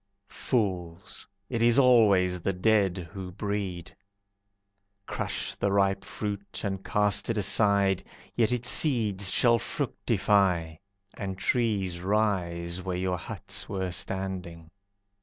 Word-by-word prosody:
Fools! 95 -7 -3 0.2
It 115 0 -3
is 120 +1 +4
always 100 -9 +4
the 95 - -1
dead 95 -3 +1
who 95 -2 -7
breed. 95 -3 -4 1.1
Crush - - -2
the 100 - -1
ripe 100 -1 +2
fruit, 100 -1 -5
and 95 -2 -3
cast 105 -1 +1
it 115 - 0
aside, 100 -1 +2 0.3
Yet 115 -2 +2
its 125 0 -1
seeds 105 - +3
shall 120 -1 +4
fructify, 90 -7 0 0.4
And 95 -2 -4
trees 100 -6 0
rise 90 -4 -1
where 90 -1 -3
your 90 -1 -1
huts - - -4
were 95 -2 -2
standing. 90 -3 -4
95 Hz, 115 wpm, -27 LUFS, 90-105 Hz, 1.1 s, is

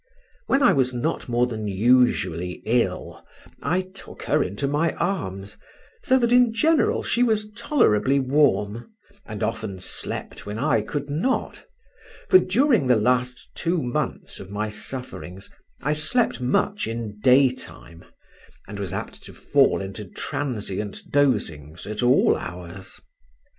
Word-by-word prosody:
When 275 +1 +3
I - - +6
was 130 -2 +1
not 130 +2 -2
more 120 +1 +2
than 110 -3 -4
usually 100 -5 +2
ill 120 +2 -1 0.4
I 175 +6 +1
took 185 +1 -12
her - - +2
into 100 +9 -2
my 150 +4 +1
arms, 100 - -3 0.4
so 260 - +3
that 240 -2 +1
in 245 -2 +4
general 315 +5 +2
she 240 - 0
was 215 -3 +1
tolerably 140 - +2
warm, 130 - +1 0.4
and 105 -2 -5
often 110 -4 -3
slept 90 - -5
when 105 +1 -4
I 125 -3 +2
could 145 +6 -4
not, 180 - -1 0.7
for 370 - +8
during 235 - +2
the 125 - +5
last 125 +3 0
two 170 +1 -1
months 120 -1 -3
of 95 - -10
my 105 +2 -3
sufferings 105 -5 -7 0.3
I 150 +2 +1
slept 155 - 0
much 130 - 0
in 115 -2 -5
daytime, 125 - +1 0.6
and - - -7
was - - -4
apt - - -6
to - - -12
fall - - +2
into 95 +2 -6
transient 105 -2 -4
dosings 90 - 0
at 105 +2 -4
all 125 +1 +4
hours. 90 +2 -8
125 Hz, 135 wpm, -24 LUFS, 105-160 Hz, 0.7 s, for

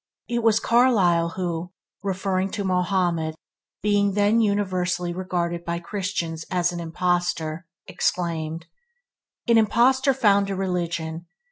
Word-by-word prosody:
It 235 0 -1
was 225 -1 +4
Carlyle 195 -10 +3
who, 175 -1 -3 0.3
referring 190 -1 -1
to 205 - -2
Mohammed 180 -4 0 0.5
being 205 -1 +2
then 205 +3 +3
universally 185 -4 0
regarded 175 -2 -2
by 170 0 -2
Christians 170 -3 -3
as 175 -1 +1
an 175 - -5
impostor, 170 -1 -1 0.2
exclaimed, 165 -2 -2 0.8
"An 230 -1 +5
impostor 260 +5 +3
found 200 -5 +3
a 195 - -2
religion! 170 -3 -3
180 Hz, 115 wpm, -24 LUFS, 170-205 Hz, 0.8 s, An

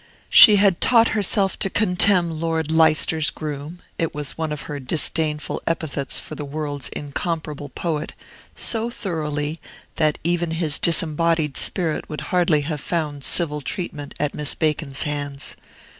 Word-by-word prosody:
She 210 - +10
had 195 -3 +3
taught 230 -2 +5
herself 200 -2 +1
to 195 - +1
contemn 180 -3 +3
"Lord 160 -1 -2
Leicester's 160 -2 +3
groom" 150 +4 -7 0.2
(it 165 -2 -1
was 145 -2 -3
one 160 -1 -3
of 150 -2 -5
her 145 -1 -6
disdainful 150 +1 -1
epithets 160 -4 -2
for - - -9
the 150 - -6
world's 145 -1 -4
incomparable 150 0 -4
poet) 155 +1 -3 0.4
so 230 0 +1
thoroughly, 155 -7 -3 0.4
that 155 -2 +2
even 170 0 0
his 155 -4 0
disembodied 165 -2 +1
spirit 170 -5 0
would 150 - -5
hardly 170 -4 +3
have 150 -1 -4
found 150 -5 -3
civil 150 0 -1
treatment 145 -1 -5
at 150 -1 -1
Miss 150 -1 -1
Bacon's 150 -3 -1
hands. 145 -1 -3
155 Hz, 145 wpm, -22 LUFS, 150-170 Hz, 0.4 s, She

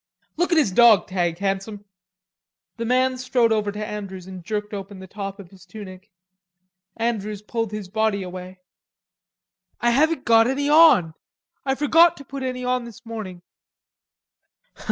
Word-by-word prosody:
"Look 350 +3 0
at 340 - +3
his 290 -11 +3
dawg 225 -1 +6
tag, 175 -3 -1
Handsome." 200 +2 -3 0.9
The 230 - -3
man 255 +1 +1
strode 250 -2 +1
over 210 -2 0
to 210 +1 -5
Andrews 195 -4 -7
and 185 -2 -10
jerked 210 +1 -4
open 200 0 -7
the 190 - -10
top 195 +1 -7
of 185 -3 -12
his 190 -3 -17
tunic. 195 -2 -11 0.9
Andrews 215 -3 -3
pulled 225 -1 -3
his 210 -3 -6
body 215 0 0
away. 185 0 -9 1.2
"I 240 +1 +2
haven't 310 +3 +2
got 225 0 +5
any 275 +2 -1
on. 295 - +6 0.5
I 265 - +2
forgot 330 +4 +4
to 280 - -12
put 275 +1 -7
any 255 -1 -4
on 250 -1 -1
this 235 +2 -13
morning." 200 -6 -7
215 Hz, 155 wpm, -23 LUFS, 195-250 Hz, 1.2 s, dawg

